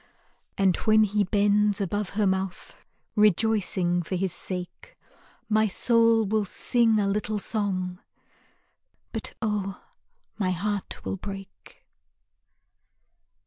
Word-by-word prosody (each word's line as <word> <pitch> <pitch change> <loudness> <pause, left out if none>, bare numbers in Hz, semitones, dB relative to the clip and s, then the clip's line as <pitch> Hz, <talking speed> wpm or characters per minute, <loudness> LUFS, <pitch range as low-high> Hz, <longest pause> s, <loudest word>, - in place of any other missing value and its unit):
And 190 -3 +3
when 215 0 +4
he 210 0 +1
bends 205 +1 +3
above 205 0 -2
her 210 - +3
mouth, 190 -1 -3 0.3
Rejoicing 205 -4 +2
for 175 +3 -4
his 185 -1 -1
sake, 180 -2 -6 0.5
My 215 0 +3
soul 230 +2 +3
will 215 +1 +1
sing 225 +2 +1
a 205 - +1
little 210 +1 -1
song, 190 -4 -2 1.1
But - - -5
oh, 205 -3 -2 0.6
my 190 -3 +1
heart 200 +2 -3
will - - -3
break. 195 0 -10
205 Hz, 105 wpm, -26 LUFS, 190-215 Hz, 1.1 s, when